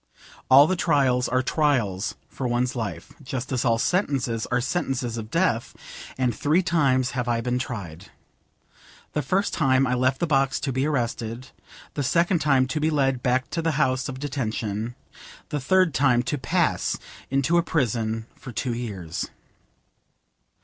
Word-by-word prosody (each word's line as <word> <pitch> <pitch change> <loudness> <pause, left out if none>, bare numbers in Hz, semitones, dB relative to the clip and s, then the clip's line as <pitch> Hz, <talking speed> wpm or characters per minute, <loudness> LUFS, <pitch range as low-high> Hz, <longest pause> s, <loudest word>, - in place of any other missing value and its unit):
All 145 +7 +7
trials 135 -7 +2
are 130 +1 +1
trials 120 - 0
for 130 - -4
one's 120 +1 0
life, 115 -4 -5
just 130 0 -5
as 130 -2 0
all 115 -2 +3
sentences 130 - 0
are 125 - +1
sentences 125 -5 -2
of 110 -2 -6
death; 165 -7 0 0.4
and 125 -2 +1
three 155 - +2
times 135 -8 +2
have 125 -1 -2
I 120 -1 +1
been 125 +1 -1
tried. 95 -9 -6 1.0
The 150 - 0
first 185 +9 0
time 135 -4 +3
I 125 - 0
left 130 +1 +1
the - - +1
box 135 -4 +2
to 135 - -2
be 130 +3 +1
arrested, 120 -3 -2 0.4
the 145 - -2
second 170 +6 +2
time 135 -4 +3
to 140 - -1
be 155 +1 +2
led 135 -4 +1
back 130 +1 0
to 165 - -1
the 165 -1 0
house 130 -1 +1
of 130 -1 -6
detention, 115 -5 -3 0.5
the 150 - -2
third 185 +4 +3
time 130 -4 +3
to 145 - -2
pass 165 +6 0 0.3
into 140 +6 +2
a - - +1
prison 115 - -1
for 130 - -10
two 120 +1 -2
years. 100 -9 -4
130 Hz, 160 wpm, -25 LUFS, 120-145 Hz, 1.0 s, All